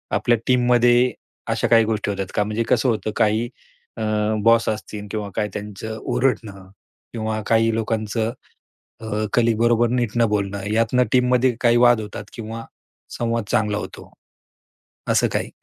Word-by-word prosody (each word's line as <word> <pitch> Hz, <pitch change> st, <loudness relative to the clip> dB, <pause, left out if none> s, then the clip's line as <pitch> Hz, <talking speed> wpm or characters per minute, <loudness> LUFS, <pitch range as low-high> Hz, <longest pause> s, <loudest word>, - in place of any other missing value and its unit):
आपल्या 120 Hz, -1 st, +2 dB
टीममध्ये 125 Hz, 0 st, +4 dB, 0.4 s
अशा -, -, 0 dB
काही 115 Hz, -1 st, +5 dB
गोष्टी 110 Hz, -2 st, -2 dB
होतात 95 Hz, -1 st, -3 dB
का? 105 Hz, -, +2 dB
म्हणजे 110 Hz, +2 st, -2 dB
कसं 125 Hz, +1 st, +3 dB
होतं. 110 Hz, -1 st, -1 dB
काही 110 Hz, +3 st, +1 dB, 0.5 s
अ, -, -, -5 dB, 0.4 s
बॉस 115 Hz, +1 st, +4 dB
असतील 105 Hz, -1 st, -5 dB
किंवा 105 Hz, -2 st, -4 dB
काही 105 Hz, -, -1 dB
त्यांचं 105 Hz, +2 st, -6 dB
ओरडणं 110 Hz, -7 st, -2 dB, 0.4 s
किंवा 110 Hz, -1 st, -3 dB
काही 115 Hz, 0 st, +3 dB
लोकांचं 110 Hz, 0 st, -1 dB, 0.7 s
अ, 110 Hz, -, -8 dB, 0.3 s
कलीग 115 Hz, -2 st, +2 dB
बरोबर 120 Hz, 0 st, +3 dB
नीट 120 Hz, -3 st, 0 dB
न 115 Hz, -, +4 dB
बोलणं. 100 Hz, -1 st, -2 dB
यातनं 115 Hz, +3 st, +2 dB
टीममध्ये 125 Hz, 0 st, +3 dB
काही 120 Hz, -1 st, +4 dB
वाद 120 Hz, -2 st, +4 dB
होतात 105 Hz, 0 st, -7 dB
किंवा 115 Hz, 0 st, -7 dB, 0.5 s
संवाद 115 Hz, -2 st, -1 dB
चांगला 105 Hz, -1 st, +1 dB
होतो. -, -, -9 dB, 1.0 s
असं -, -, +3 dB
काही. -, -, -1 dB
115 Hz, 145 wpm, -21 LUFS, 105-120 Hz, 1.0 s, काही